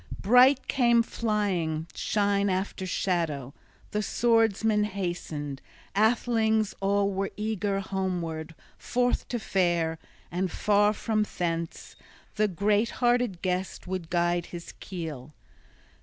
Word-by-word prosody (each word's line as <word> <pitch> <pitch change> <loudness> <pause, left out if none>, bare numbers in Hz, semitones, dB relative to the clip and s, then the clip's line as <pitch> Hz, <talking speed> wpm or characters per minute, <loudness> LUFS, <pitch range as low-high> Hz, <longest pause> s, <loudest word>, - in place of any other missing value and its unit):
Bright 250 +6 +5
came 235 -3 +4
flying 190 -9 -1
shine 200 -1 +1
after 190 0 -2
shadow. 160 -9 -1 0.4
The 210 - 0
swordsmen 225 -1 +2
hastened, 175 -8 -4 0.3
athelings 220 0 +2
all 200 0 +2
were 195 +1 -1
eager 210 -2 -1
homeward 175 -5 -3 0.2
forth 245 0 0
to 245 - -2
fare; 175 -6 0 0.3
and 180 0 -1
far 205 0 +3
from 215 0 0
thence 165 -1 -3 0.4
the 215 0 +3
great 205 +4 +1
hearted 240 -7 +1
guest 185 0 -2
would 180 -3 -4
guide 175 0 +1
his 170 -1 -8
keel. 155 -6 -7
195 Hz, 110 wpm, -27 LUFS, 175-215 Hz, 0.4 s, Bright